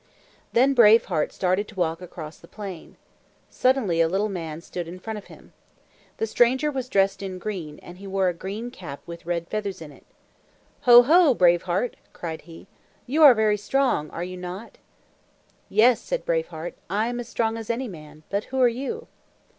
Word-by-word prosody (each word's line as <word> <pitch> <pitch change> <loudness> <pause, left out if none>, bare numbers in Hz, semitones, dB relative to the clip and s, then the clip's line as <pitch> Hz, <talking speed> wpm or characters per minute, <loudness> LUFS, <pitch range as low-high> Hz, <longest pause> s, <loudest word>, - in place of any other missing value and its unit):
Then 265 +4 +4
Brave 230 -3 +6
Heart 160 -5 -1
started 190 +2 0
to 215 - -14
walk 165 -2 -1
across 165 -3 -9
the 170 - -16
plain. 195 -5 -9 0.5
Suddenly 245 -11 +2
a 165 - +4
little 195 +5 0
man 165 -5 -5
stood 175 0 -6
in 175 +2 -8
front 215 +3 -6
of 200 - -16
him. - - -16 0.6
The - - 0
stranger 255 +6 +2
was 260 -2 -4
dressed 195 -1 +2
in 190 -2 -5
green, 180 -6 -6
and 175 +1 -12
he 200 - -9
wore 190 -1 +1
a 180 - +1
green 205 +7 -6
cap 155 - -9
with 170 0 -10
red 170 -1 -2
feathers 205 -3 -4
in 155 -2 -10
it. - - -19 0.8
"Ho, 240 0 +10
ho, 310 0 +5
Brave 175 -3 +4
Heart!" 190 +8 -1 0.2
cried 160 -2 -6
he. 165 - -12 0.4
"You 295 +6 0
are 285 -5 +9
very 215 -1 +2
strong, 210 - 0
are 170 - -5
you 185 +1 -6
not?" 180 +5 -8 0.9
"Yes," 225 +4 +4
said - - -3
Brave - - 0
Heart, - - -7 0.2
"I 210 +2 +1
am 240 +1 -3
as 240 - -6
strong 225 -1 0
as 225 -1 -7
any 245 +2 -1
man. 155 -5 -12
But 200 +1 -1
who 265 - -4
are 250 - +6
you?" 275 - -4
200 Hz, 195 wpm, -24 LUFS, 175-240 Hz, 0.9 s, Ho